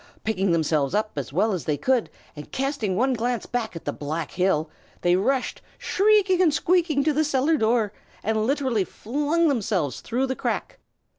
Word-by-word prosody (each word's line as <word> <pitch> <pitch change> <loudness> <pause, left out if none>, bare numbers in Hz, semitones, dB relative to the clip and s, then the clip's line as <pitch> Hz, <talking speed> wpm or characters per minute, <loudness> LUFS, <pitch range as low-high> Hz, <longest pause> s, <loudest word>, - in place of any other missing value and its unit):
Picking 195 -4 0
themselves 155 -3 +1
up 215 +1 0
as 140 -3 -4
well 200 +9 +2
as 180 - -3
they 150 -2 0
could, 255 - +1 0.3
and 150 -1 -10
casting 270 -8 -1
one 260 +6 +2
glance 240 0 -1
back 230 -6 -3
at 165 - -8
the - - -2
black 150 +2 -4
hill, 180 -4 +1 0.3
they 175 0 +3
rushed 255 +7 0 0.2
shrieking 395 -2 +3
and 340 -4 +5
squeaking 330 -2 +2
to 305 +1 +2
the 310 +2 +2
cellar 295 +1 +2
door, 225 -4 +1 0.3
and 220 0 0
literally 260 -7 +1
flung 295 - 0
themselves 200 - 0
through 250 +3 -1
the 260 0 -2
crack. - - -3
230 Hz, 175 wpm, -24 LUFS, 185-280 Hz, 0.3 s, and